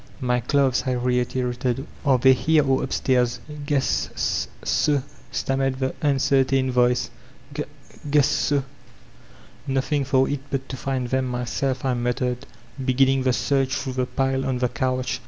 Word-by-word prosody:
"My 125 -2 +1
clothes/' 135 0 +1
I 130 - +1
reiterated; 125 +1 -1 0.2
''are 135 -4 +3
they 130 +2 +6
here 150 +2 +2
or 135 0 +2
up 130 - -4
stairs? 125 -2 +1 0.3
"Guess 145 -3 +1
s - - 0 0.2
so/' 145 -3 +1 0.3
stammered 135 0 0
the 130 0 -1
tmcertain 135 -2 +2
voice, 125 -1 +2 0.4
"g 150 +1 -2 0.5
guess 145 0 +2 1.2
''Nothing 135 +2 0
for 135 0 +2
it 145 - -2
but 135 -1 -3
to 130 - -4
find 130 -2 -2
them 130 0 0
myself/' 125 +2 -2
I 130 - +2
mattered, 125 +1 -2 0.4
beginning 135 +1 +3
the 130 0 +2
search 135 +1 +1
through 130 -1 -3
the 125 -1 -1
pile 135 +1 0
on 130 -1 -1
the 125 0 0
couch. 130 +1 -1
130 Hz, 150 wpm, -23 LUFS, 125-135 Hz, 1.2 s, they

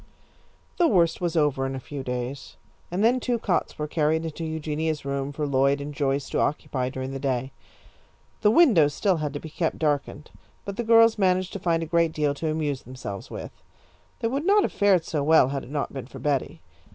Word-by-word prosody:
The 350 - +4
worst 170 - +2
was 175 -1 -1
over 145 -3 +2
in 135 - -4
a - - -4
few 140 +2 -7
days, 125 +1 -5 0.3
and 180 +4 -1
then 245 +3 +4
two 245 -1 0
cots 200 -5 -1
were 150 - -3
carried 160 +1 +1
into 165 +1 -5
Eugenia's 155 -1 -3
room 140 0 -2
for 150 +1 -3
Lloyd 140 0 +2
and 145 +1 -6
Joyce 140 -1 -1
to - - 0
occupy 130 -3 -1
during 130 0 -5
the 135 - -5
day. 130 -1 -2 0.9
The 210 - +5
windows 210 - +5
still 190 -4 +1
had 150 -2 -2
to 145 - -4
be 160 - -9
kept 165 0 -1
darkened, 150 -1 -2 0.3
but 200 - -5
the 235 - -2
girls 230 -1 +5
managed 185 -1 +1
to 200 - -4
find 165 -2 0
a - - -3
great 165 0 +1
deal 150 -2 +1
to 155 +3 -3
amuse 150 -3 -2
themselves 115 -6 -8
with. - - -7 0.7
They 230 - +1
would 275 +5 -2
not 405 +3 +4
have - - -2
fared 195 -5 +3
so 155 -3 -2
well 150 -3 +5
had 140 -1 -3
it - - -12
not 145 -1 -3
been 135 -3 -6
for - - -11
Betty. 145 -3 -2
155 Hz, 210 wpm, -25 LUFS, 140-180 Hz, 0.9 s, The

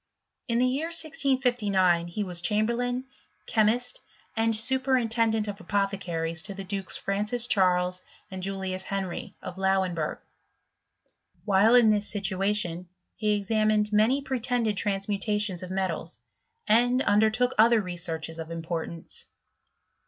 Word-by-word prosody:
In 235 -1 +1
the 250 - +3
year 270 +6 0
1659, 245 - +1
he 190 +5 -3
was 180 -3 -3
chamberlain, 235 +6 0 0.4
chemist, 240 +3 +1 0.4
and 225 0 +2
superintendent 230 -3 +1
of 205 0 -6
apothe 200 +1 -1
caries 165 -2 -3
to 200 +2 -8
the 195 - -6
dukes 195 0 -4
Francis 210 +4 -2
Charles 180 -3 +2 0.3
and 190 0 -6
Julius 190 -1 -3
Henry, 195 -3 -4
of 180 - -7
Lauenbui^. 190 -4 0 1.3
While 205 +3 +5
in 235 -3 +7
this 205 -1 +1
situation, 195 -3 0 0.3
he 210 -1 +1
examined 215 0 +1
many 235 +7 +3
pretended 245 -4 -1
transmutations 200 -1 0
of 185 - -7
metals, 185 -7 -3 0.5
and 245 +4 +3
under 210 +2 +4
took 250 +3 0
other 230 +1 +6
researches 165 -4 -4
of 160 0 -6
importance. 165 0 -5
205 Hz, 125 wpm, -27 LUFS, 185-230 Hz, 1.3 s, in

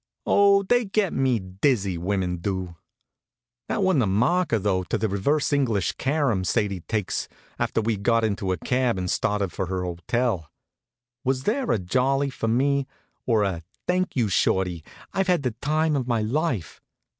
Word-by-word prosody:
Oh, 200 0 +5
they 245 +4 +2
get 200 -1 0
me 130 -3 +2
dizzy, 95 +1 0
women 90 0 -1
do! 90 -1 -3 0.9
That 205 - 0
wa'n't 185 -8 +3
a 110 - +1
marker 125 - +2
though, 95 -2 0
to - - -1
the 110 - 0
reverse 140 +10 0
English 115 -9 +1
carom 135 -8 0
Sadie 100 -1 0
takes 105 +3 -2 0.3
after - - 0
we'd 110 -2 -1
got 115 +2 +2
into 100 -3 -1
a 90 - 0
cab 125 +4 0
and 90 -1 -2
started 100 -3 0
for 95 - -3
her 90 0 -2
hotel. 90 0 -1 0.7
Was 130 -1 0
there 250 - 0
a - - +3
jolly 130 +9 +1
for 115 - -3
me, 135 +4 +2 0.4
or 110 -4 +3
a 95 -4 -1 0.2
"Thank 185 +1 0
you, 120 -5 +2
Shorty, 90 -3 +1 0.3
I've 190 -1 0
had 175 -5 +2
the 125 - 0
time 155 +1 +1
of 130 -3 -1
my 115 -3 +1
life?" 120 - -2
115 Hz, 170 wpm, -25 LUFS, 95-140 Hz, 0.9 s, Oh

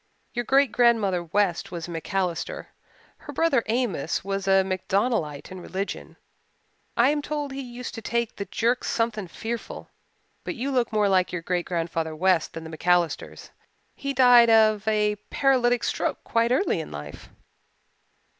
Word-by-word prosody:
Your 240 0 -2
great 275 -1 +3
grandmother 220 -7 +3
West 175 +1 0
was 170 -2 -5
a - - -8
MacAllister. 185 - -3 0.5
Her - - -10
brother 325 -7 +2
Amos 220 - -1
was 195 0 -3
a 195 0 +5
MacDonaldite 190 - -1
in 185 -1 -8
religion. 195 +3 -5 0.8
I 245 +4 +5
am 295 0 -1
told 290 -1 -4
he 270 +1 -5
used 245 -1 -7
to 225 - -7
take 235 +1 -2
the 200 - -5
jerks 240 +4 0
something 225 -4 -1
fearful. 230 +6 -6 0.5
But - - -4
you 265 +4 -3
look 245 -3 +1
more 210 -2 +2
like 185 -2 +2
your 175 -2 -4
great 175 0 -1
grandfather 165 -2 -2
West 180 0 +2
than 165 - -7
the 160 0 -8
MacAllisters. 175 -2 0 0.4
He 280 -1 -3
died 245 -3 +6
of 215 -1 +4
a 210 -1 +2
paralytic 245 -3 +2
stroke - - -2
quite 230 0 +1
early 260 - +1
in 160 - -6
life." 75 0 -9
210 Hz, 155 wpm, -25 LUFS, 180-240 Hz, 0.8 s, died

